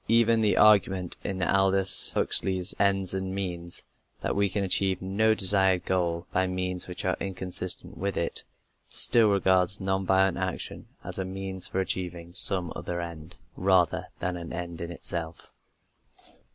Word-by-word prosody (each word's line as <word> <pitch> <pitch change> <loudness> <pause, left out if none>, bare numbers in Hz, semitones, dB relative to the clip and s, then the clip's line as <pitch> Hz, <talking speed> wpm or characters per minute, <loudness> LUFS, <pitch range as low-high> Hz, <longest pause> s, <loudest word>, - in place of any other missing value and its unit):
Even 115 0 +4
the 105 -2 +2
argument 95 -4 +3
in 95 -2 -3
Aldous 95 0 +4
Huxley's 95 0 0
Ends 95 -2 +2
and 95 0 -3
Means, 85 -3 -4 0.4
that - - -2
we 100 0 +2
can 100 +2 -1
achieve 95 0 +3
no 105 +4 +1
desired 95 -2 +3
goal 85 -2 -1
by 95 0 +1
means 90 0 -2
which 90 0 -6
are 95 - +1
inconsistent 95 -1 -5
with 100 0 -2
it, 85 - -2 0.5
still 115 -3 +3
regards 95 -1 +3
non 95 0 -1
violent 95 -1 +3
action 95 -1 -4 0.2
as - - -6
a - - -1
means 95 0 -6
for 95 - -3
achieving 90 -2 -3
some 90 -3 +2
other 85 0 -4
end, 85 -1 -8 0.2
rather 95 -2 +2
than 90 -1 -3
an 85 -1 -8
end 85 -1 -6
in 85 0 -5
itself. 85 -1 -6
95 Hz, 150 wpm, -27 LUFS, 90-95 Hz, 0.5 s, Even